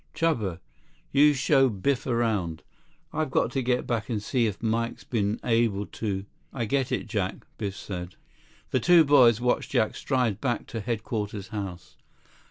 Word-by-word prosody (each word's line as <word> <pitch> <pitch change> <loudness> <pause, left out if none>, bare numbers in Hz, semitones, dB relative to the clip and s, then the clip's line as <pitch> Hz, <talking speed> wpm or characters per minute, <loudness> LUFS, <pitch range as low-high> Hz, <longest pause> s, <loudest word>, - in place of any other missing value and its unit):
"Chuba, 110 - 0 0.5
you 145 +1 +5
show 135 0 +4
Biff 125 +6 -1
around. 110 -10 0 0.5
I've 155 -2 -1
got 120 - +1
to 135 - -1
get 125 0 0
back 115 -2 -2
and 110 -3 -1
see 115 +2 +1
if 105 -2 -4
Mike's 115 +1 -1
been 105 -3 -1
able 115 -4 +1
to—" 100 -3 -4 0.3
"I 120 -4 -2
get 135 +3 0
it, - - -1
Jack," 100 -4 -3
Biff 100 -3 -3
said. 90 -2 -6 0.6
The - - +2
two 175 -2 +6
boys 125 -6 +6
watched 125 0 0
Jack 110 - +1
stride 125 -7 0
back 120 -4 -1
to 115 - -4
Headquarters 105 -3 -3
House. 95 -5 -6
115 Hz, 160 wpm, -27 LUFS, 100-130 Hz, 0.6 s, two